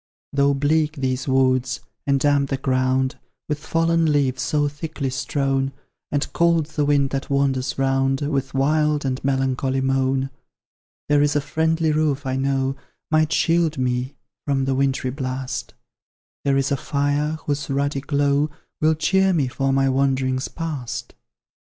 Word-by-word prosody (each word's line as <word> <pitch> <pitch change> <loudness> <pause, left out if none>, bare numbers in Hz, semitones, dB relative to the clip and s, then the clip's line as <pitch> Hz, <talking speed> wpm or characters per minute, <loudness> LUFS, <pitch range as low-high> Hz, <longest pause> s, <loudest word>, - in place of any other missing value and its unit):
Though 140 0 +3
bleak 155 +2 +1
these 130 -1 -2
woods, 130 -1 +2 0.3
and 140 -1 +3
damp 140 0 +2
the 135 - -1
ground 130 0 0 0.3
With 150 -1 -2
fallen 165 0 +2
leaves 135 -3 +1
so 145 +2 +1
thickly 145 -2 -4
strown, 135 0 -1 0.4
And 145 -1 -1
cold 170 -2 +3
the 150 -1 -1
wind 140 -2 +2
that 135 0 -3
wanders 135 -2 0
round 135 0 +1
With 135 -2 -2
wild 150 +1 +2
and 130 -1 -2
melancholy 135 0 0
moan; 135 0 0 0.8
There 145 -1 +4
IS 145 0 +2
a - - +4
friendly 160 +3 +1
roof, 150 -2 0
I 130 0 -1
know, 135 0 0 0.4
Might 155 0 +3
shield 165 -1 +2
me 125 +1 -1 0.3
from 135 -2 +1
the 135 - +1
wintry 135 -1 0
blast; 130 -2 -4 0.7
There 140 -1 +3
is 135 0 0
a 140 - +2
fire, 145 +3 0
whose 145 -1 -2
ruddy 140 0 0
glow 145 +1 +1 0.3
Will 155 +1 +4
cheer 190 +4 +2
me 145 -6 +1
for 135 +2 -1
my 135 0 +2
wanderings 130 -1 +1
past. 155 -8 -5
140 Hz, 150 wpm, -22 LUFS, 135-150 Hz, 0.8 s, There